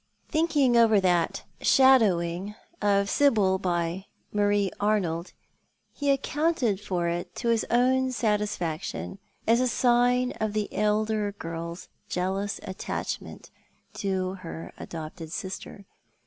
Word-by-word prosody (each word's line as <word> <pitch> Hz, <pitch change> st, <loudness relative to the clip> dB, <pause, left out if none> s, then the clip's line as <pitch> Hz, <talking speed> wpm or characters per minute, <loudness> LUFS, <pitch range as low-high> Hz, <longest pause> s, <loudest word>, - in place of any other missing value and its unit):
Thinking 310 Hz, -6 st, +2 dB
over 225 Hz, -3 st, +6 dB
that 180 Hz, -3 st, +1 dB
" -, -, -35 dB
shadowing 205 Hz, -7 st, +4 dB
" 345 Hz, -, -35 dB, 0.2 s
of 200 Hz, 0 st, +1 dB
Sibyl 205 Hz, -8 st, +3 dB
by 175 Hz, 0 st, -2 dB, 0.3 s
Marie 205 Hz, -2 st, +2 dB
Arnold, 185 Hz, -5 st, 0 dB, 0.6 s
he 285 Hz, -1 st, -2 dB
accounted 275 Hz, -, +1 dB
for 180 Hz, -4 st, -1 dB
it 170 Hz, +1 st, -3 dB
to 235 Hz, -, -2 dB
his 230 Hz, -1 st, +2 dB
own 260 Hz, +2 st, +3 dB
satisfaction 205 Hz, -6 st, -2 dB, 0.3 s
as 230 Hz, +2 st, +4 dB
a 255 Hz, -, +2 dB
sign 245 Hz, +1 st, +3 dB
of 215 Hz, -1 st, 0 dB
the 215 Hz, -1 st, -2 dB
elder 210 Hz, 0 st, 0 dB
girl's 170 Hz, -1 st, -6 dB, 0.2 s
jealous 195 Hz, +3 st, -2 dB
attachment 190 Hz, +2 st, -5 dB, 0.4 s
to 190 Hz, -2 st, -2 dB
her 165 Hz, -2 st, -8 dB
adopted 160 Hz, 0 st, -7 dB
sister. 195 Hz, +2 st, -6 dB
205 Hz, 120 wpm, -27 LUFS, 180-240 Hz, 0.6 s, over